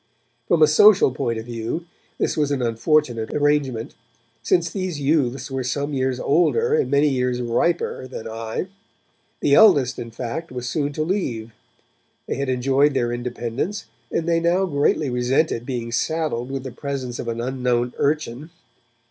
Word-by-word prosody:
From 165 -2 +4
a - - +7
social 180 +1 +6
point 115 -2 -2
of 110 - -6
view 120 +8 -4 0.3
this - - 0
was 150 -2 +1
an 140 -2 0
unfortunate 120 0 +1
arrangement, 145 -6 0 0.5
since 170 +9 +2
these 185 -6 -4
youths 135 -3 0
were 135 -1 -2
some 140 +4 -2
years 130 -1 0
older 450 - +2
and 460 - +2
many 140 +2 +3
years 125 -3 0
riper 130 +3 0
than 130 - -7
I; 115 +5 -4 0.8
the 140 - +2
eldest, 140 - +5
in 115 - -6
fact, 125 +8 -5
was 125 -1 -5
soon 145 +2 -1
to 155 - -1
leave; 125 - -2 0.7
they - - -3
had 140 -1 -2
enjoyed 135 +3 +2
their 120 -2 0
independence, 120 - -3 0.3
and 165 - -1
they 165 -1 +3
now 175 +3 +2
greatly 145 -3 +1
resented 125 0 0
being 120 -3 -3
saddled 135 -1 -1
with 135 -1 -4
the 130 - -6
presence 130 -2 -5
of - - -5
an 115 0 -3
unknown 125 -1 -1
urchin. 150 -1 -1
135 Hz, 160 wpm, -22 LUFS, 120-155 Hz, 0.8 s, a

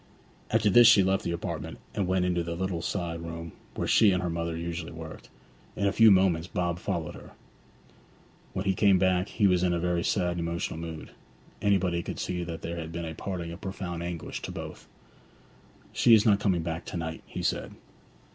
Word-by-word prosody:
After 110 -2 +3
this 120 +3 +8
she 105 -4 +7
left 95 +1 +1
the - - -2
apartment, 85 - -4 0.2
and 100 -3 -1
went 95 0 +2
into 90 -1 +1
the 85 0 -4
little 90 -1 -2
side 85 -2 -3
room 85 0 -6 0.2
where - - -2
she 110 - +6
and 90 -1 +1
her 90 - -1
mother 85 0 -2
usually 85 0 -4
worked. 80 -1 -9 0.5
In 100 - -1
a 100 - +3
few 115 +3 +7
moments 95 -4 +4
Bob 90 -1 -2
followed 85 -5 -3
her. - - -12 1.2
When 95 - -3
he 95 - +3
came 95 0 +4
back 95 +1 +2
he 105 - +1
was 90 -2 +4
in 90 -1 +2
a 85 - 0
very 85 0 0
sad 90 -3 0
and - - -2
emotional 85 -1 -3
mood. 80 -1 -7 0.5
Anybody 95 -4 +2
could - - -6
see 90 -1 -2
that 85 -1 -6
there 85 +1 -4
had 80 -1 -5
been 85 0 -4
a 80 - -5
parting 85 -1 -5
of 85 - -9
profound 95 -3 -5
anguish 85 -1 -5
to - - -5
both. - - -8 1.1
'She 115 -2 +6
is 105 - +3
not 105 -3 +5
coming 95 -5 +1
back 80 0 -3
to - - -5
night,' 80 -1 -4
he - - -6
said. - - -1
90 Hz, 205 wpm, -28 LUFS, 85-95 Hz, 1.2 s, this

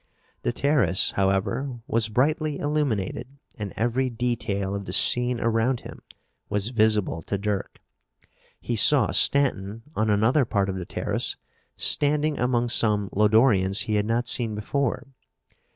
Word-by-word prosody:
The - - -1
terrace, 135 -8 +1
however, 100 +7 -1
was 115 -6 0
brightly 150 +5 0
illuminated 145 -12 -2 0.3
and 105 -2 -5
every 120 +4 -1
detail 110 -5 -3
of 100 0 -5
the - - -5
scene 125 0 +4
around 115 +2 0
him - - -12 0.5
was 105 +1 -1
visible 110 -7 +1
to 100 - -4
Dirk. 100 0 -4 0.8
He 120 - -4
saw 135 +6 +4
Stanton, 115 -6 +2
on 110 0 0
another 110 +8 +2
part 100 -4 -1
of 95 - -3
the 90 -2 -6
terrace, - - -2 0.4
standing 150 +1 +1
among 120 -1 0
some 105 -4 +2
Lodorians 105 -2 +3
he 110 -3 -3
had 105 0 0
not 120 +1 -1
seen 115 -3 +1
before. 125 +4 -2
115 Hz, 135 wpm, -24 LUFS, 105-130 Hz, 0.8 s, scene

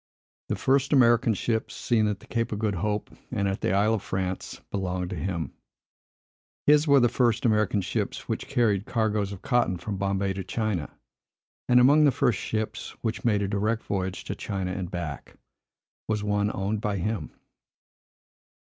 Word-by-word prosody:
The - - +1
first 135 +2 +2
American 120 -4 +5
ships, 110 +2 -1
seen 110 -3 +1
at 105 -2 -2
the - - -14
Cape 115 0 -2
of 105 - -2
Good 105 -1 0
Hope 105 +3 -2 0.2
and 100 -5 -1
at 95 0 -2
the - - +1
Isle 100 +3 +3
of 110 - 0
France, 95 -1 -3
belonged 90 -2 -2
to - - -3
him. 85 -3 -3 1.1
His 150 +1 +5
were 140 -1 +6
the 120 - +5
first 120 -1 +1
American 105 -2 +2
ships 90 - -3
which - - -3
carried 110 -7 +1
cargoes 105 -3 0
of 100 - -8
cotton 120 -8 +2
from 95 +4 -4
Bombay 100 0 0
to 95 0 -4
China; 100 -5 -2 0.8
and 125 0 +7
among 145 +5 +6
the 145 - +5
first 130 -3 +1
ships 110 -1 -3
which 110 -1 -2
made 105 -4 +2
a - - 0
direct 105 +3 0
voyage 95 -2 -3
to - - -4
China 95 -2 -3
and 90 -1 -4
back, 85 -5 -6 0.7
was 105 -1 -1
one 105 0 +1
owned 100 +2 -2
by 105 -2 -1
him. 105 +4 -2
105 Hz, 175 wpm, -27 LUFS, 95-115 Hz, 1.1 s, and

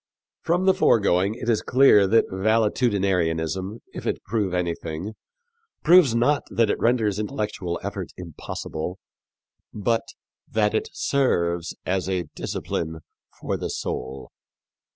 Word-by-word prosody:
From 175 +3 +1
the 190 - +6
foregoing 100 - +3
it 120 - -7
is 115 -3 +2
clear 125 -7 +5
that 115 +4 +4
valetudinarianism, 95 -3 0
if - - -6
it - - -2
prove 105 -2 -1
anything, 85 +2 -3 0.7
proves 165 -7 +6
not 140 +5 +3
that 115 -3 +2
it - - -2
renders 110 -4 +1
intellectual 105 -7 -3
effort - - -4
impossible, 85 0 -6 0.7
but 115 +2 0 0.5
that 105 -1 +1
it 110 - -1
serves 85 - 0
as 95 0 -1
a 90 -2 0
discipline 80 0 -4 0.4
for - - -2
the - - -4
soul. 65 +1 -5
100 Hz, 120 wpm, -24 LUFS, 90-115 Hz, 0.7 s, the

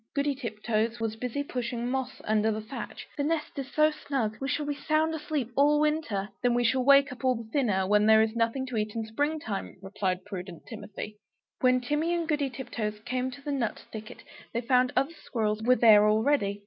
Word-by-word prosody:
Goody 285 0 +1
Tiptoes 230 -2 -2
was 225 -1 -2
busy 250 +4 -3
pushing 240 -3 -3
moss 260 0 -3
under 215 +1 +2
the 215 - -2
thatch 220 +5 -7
"The 285 - 0
nest 305 -1 -2
is 270 -1 -6
so 305 0 +4
snug, 265 -7 -2
we 270 - -1
shall 295 +2 -1
be 290 - -1
sound 310 +2 +1
asleep 300 -6 -3
all 295 +1 +4
winter." 300 -10 0
"Then 245 -1 +2
we 245 - +2
shall 255 +2 +2
wake 280 +1 +6
up 255 - -10
all 255 -1 +3
the 230 -1 -7
thinner, 210 -9 +1
when 210 +2 +3
there 220 0 +7
is 220 +1 -2
nothing 230 +3 0
to 255 -3 -4
eat 215 0 -2
in 225 -1 -2
spring 290 +8 -1
time," 205 -9 -5
replied 195 -1 -3
prudent 180 -4 -7
Timothy. 210 -2 -8 0.4
When 255 0 +3
Timmy 295 +7 0
and 335 -2 -2
Goody 295 -3 0
Tiptoes 230 -5 -4
came 255 +3 -2
to 275 +2 -11
the 290 - -3
nut 255 -6 -2
thicket, 215 -1 -9 0.3
they 235 - +1
found 250 +1 +3
other 280 +5 +1
squirrels 215 -2 -1
were 250 +3 +4
there 210 -3 +7
already. 215 -2 +2
245 Hz, 210 wpm, -28 LUFS, 215-280 Hz, 0.4 s, there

